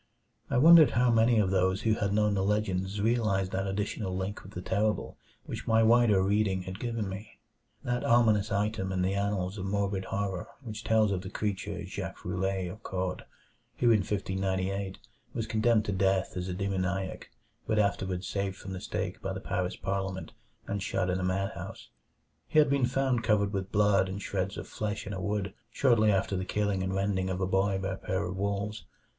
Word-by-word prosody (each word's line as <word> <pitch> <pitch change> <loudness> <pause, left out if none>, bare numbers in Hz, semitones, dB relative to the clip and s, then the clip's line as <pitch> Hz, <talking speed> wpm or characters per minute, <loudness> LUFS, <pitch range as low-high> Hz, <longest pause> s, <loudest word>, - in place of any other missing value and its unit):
I - - +1
wondered 160 +3 +9
how 125 0 +4
many 115 +1 +4
of 100 -3 +2
those 95 0 +2
who 110 - +3
had 100 -2 0
known 105 0 +2
the 95 -1 +1
legends 100 -1 0
realized 105 -4 +1
that 95 +1 -1
additional 95 -1 -2
link 95 +2 -3
with 95 - -13
the 90 - -5
terrible 105 +3 0 0.3
which - - -6
my 115 0 +4
wider 110 -4 +5
reading 100 -1 +1
had 95 +2 -7
given 115 -4 -2
me; 95 +3 -8 0.5
that 125 0 -1
ominous 110 -3 +3
item 100 -1 0
in 90 -1 0
the 95 +1 +1
annals 100 -1 -1
of 95 - -4
morbid 100 -1 -1
horror 100 -3 -3 0.2
which 110 -3 -6
tells 110 -2 +3
of 95 -2 -1
the 95 - -7
creature 105 -1 -3
Jacques - - -6
Roulet, 95 +1 -1
of 105 +6 -8
Caude, 95 -3 -3 0.5
who 120 -1 +4
in 110 - +5
1598 95 0 -2 0.4
was 115 - -1
condemned 110 0 +2
to 100 - -1
death 95 0 +1
as 90 0 -3
a 90 - -3
demoniac 95 -1 -2 0.4
but 110 - +1
afterward 95 -3 0
saved 100 +1 -2
from 95 +1 -8
the 90 - -6
stake - - -4
by 95 - -3
the 95 - -4
Paris 90 -1 -2
parliament 95 -1 -3 0.3
and 100 0 -3
shut 90 -1 0
in 90 - 0
a - - -2
madhouse. 95 +2 -3 0.6
He - - -1
had 150 -2 +6
been 135 -3 +3
found 130 -2 +1
covered 105 -2 +2
with 95 0 -3
blood 100 -2 +3
and 95 +1 -4
shreds 95 -1 -2
of - - -6
flesh 105 -1 -3
in 105 - -5
a 95 - -4
wood, 100 +1 -2 0.2
shortly 115 -4 +3
after 95 0 +1
the 95 - -1
killing 100 0 0
and 95 0 -1
rending 95 -1 0
of 95 0 -2
a 95 - +1
boy 95 +1 +1
by 95 0 -2
a 95 - -3
pair 95 +1 -2
of 90 +1 -4
wolves. 100 +2 -2
100 Hz, 195 wpm, -29 LUFS, 95-105 Hz, 0.6 s, wondered